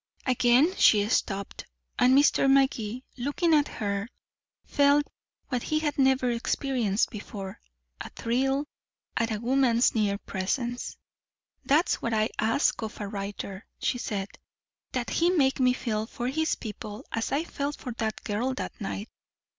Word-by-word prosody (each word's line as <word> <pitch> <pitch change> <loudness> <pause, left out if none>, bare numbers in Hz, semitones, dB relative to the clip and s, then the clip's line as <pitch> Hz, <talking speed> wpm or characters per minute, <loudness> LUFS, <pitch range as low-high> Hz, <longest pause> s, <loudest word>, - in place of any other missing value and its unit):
Again 255 +7 +4
she 205 -1 +5
stopped, 200 -4 -1 0.3
and 255 +2 +6
Mr. 280 -1 +4
Magee, 260 -3 +2 0.2
looking 290 +6 +1
at 295 -1 +4
her, 200 +1 -3 0.6
felt 285 +1 +4 0.4
what 250 -4 -1
he 310 - -1
had 300 -2 -1
never 265 -2 +3
experienced 235 -3 0
before 200 -2 -7 0.4
a - - -6
thrill 270 +4 0 0.5
at 230 0 +1
a 215 -2 -2
woman's 245 0 +3
near 205 -3 +1
presence. 235 +6 -3 0.7
"That's 305 +6 +2
what 230 -1 -1
I 215 0 +2
ask 225 +6 +2
of 220 -1 -6
a 205 - -3
writer," 200 0 -6
she 245 - 0
said, 200 -4 -3 0.6
"that 245 -2 -2
he 340 +1 +3
make 275 -8 +2
me 255 -1 +5
feel 220 -3 -2
for 245 +1 -3
his 315 +4 0
people 210 -1 -7
as 225 - -2
I 285 +4 +1
felt 285 -3 -3
for 250 - -6
that 220 -1 -2
girl 240 +6 -1
that 250 - -6
night. 200 +1 -4
245 Hz, 145 wpm, -27 LUFS, 215-275 Hz, 0.7 s, and